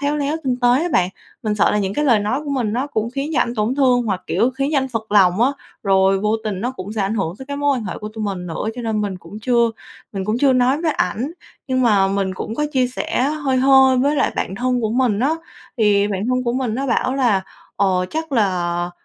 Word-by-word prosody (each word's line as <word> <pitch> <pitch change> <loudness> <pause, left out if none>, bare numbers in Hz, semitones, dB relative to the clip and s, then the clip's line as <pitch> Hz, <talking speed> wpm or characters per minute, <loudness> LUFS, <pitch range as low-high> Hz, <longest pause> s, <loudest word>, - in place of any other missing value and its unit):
khéo 285 +1 0
léo 290 +2 -1
tinh 255 -2 0
tế 245 - +4
á 350 - -1
bạn, 180 -1 +3 0.3
mình 215 -1 0
sợ 205 - +3
là 210 - +1
những 195 -1 -2
cái 295 - 0
lời 235 -6 +4
nói 215 +7 -1
của 290 - -4
mình 245 -6 -1
nó 255 +5 -1
cũng 230 -6 -2
khiến 275 +4 -3
cho - - +2
ảnh 240 0 0
tổn 215 +4 0
thương 255 -3 +3
hoặc, 195 -5 -2
kiểu, 240 - +1
khiến 275 +2 -2
cho 290 - +3
anh 265 0 -1
phật 220 -4 -5
lòng 190 -1 +4
á, 255 - +5 0.3
rồi 195 0 +3
vô 215 +2 +1
tình 200 -4 -3
nó 245 +4 -1
cũng 205 -5 -7
sẽ 220 - -3
ảnh 195 +2 0
hưởng 185 -6 -2
tới 265 - -9
cái 285 0 -4
mối 285 -1 +1
quan 235 - -4
hệ - - -5
của 210 - -6
tụi 215 0 -5
mình 190 -3 -4
nữa. 175 +5 -3
Cho 245 - -6
nên 220 -2 -1
mình 200 -3 -2
cũng 180 +5 -10
chưa 235 0 +2 0.4
mình 195 -1 -3
cũng 215 +3 -1
chưa 275 0 +4
nói 255 +4 +2
với 320 -3 +1
ảnh, 260 +4 -1 0.4
nhưng 255 -1 +1
mà 205 -5 +4
mình 195 -1 -1
cũng 215 +4 -5
có 300 - 0
chia 255 -2 +2
sẻ 250 0 -2
hơi 285 -1 0
hơi 265 0 +5
với 285 +3 +2
lại - - +1
bạn 190 - -2
thân 250 +3 0
của 220 - -1
mình 235 -3 +1
á, 275 +5 +2 0.5
thì 205 -2 +3
bạn 200 +1 -2
thân 255 0 +1
của 235 - 0
mình 250 -3 -1
nó 275 +2 -2
bảo 255 +1 0
là, 240 -8 +2 0.4
ờ, 185 -2 +1
chắc 320 -1 -4
là 175 -6 0
235 Hz, 270 wpm, -20 LUFS, 205-265 Hz, 0.5 s, á